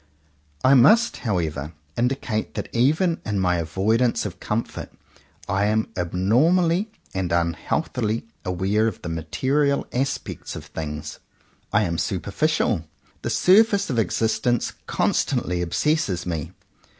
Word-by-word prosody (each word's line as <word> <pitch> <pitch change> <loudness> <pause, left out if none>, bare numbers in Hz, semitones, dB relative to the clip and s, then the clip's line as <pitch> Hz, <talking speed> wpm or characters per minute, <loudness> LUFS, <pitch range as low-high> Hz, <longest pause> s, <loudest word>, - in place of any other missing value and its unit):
I 130 - +6
must 210 - +5
however 80 - -2 0.2
indicate 120 -3 -1
that - - -4
even 155 +8 +2
in 105 -2 -1
my 90 -1 +2
avoidance 110 +9 +1
of 95 -4 -6
comfort 110 +2 -3 0.6
I 100 0 +1
am 110 +1 +1
abnormally 160 - +2 0.2
and 95 -2 -2
unhealthily 85 +7 -1 0.2
aware 95 +5 +1
of 110 - -5
the 85 - -4
material 135 - 0
aspects 135 +2 -3
of - - -8
things. 75 -1 -6 0.5
I 105 - +3
am 85 -3 -1
superficial. 100 - 0 0.4
The - - -3
surface 200 -1 +4
of 120 - +1
existence 115 +4 0
constantly 90 0 0
obsesses 95 - 0
me. 80 -2 -3
110 Hz, 115 wpm, -23 LUFS, 90-135 Hz, 0.6 s, I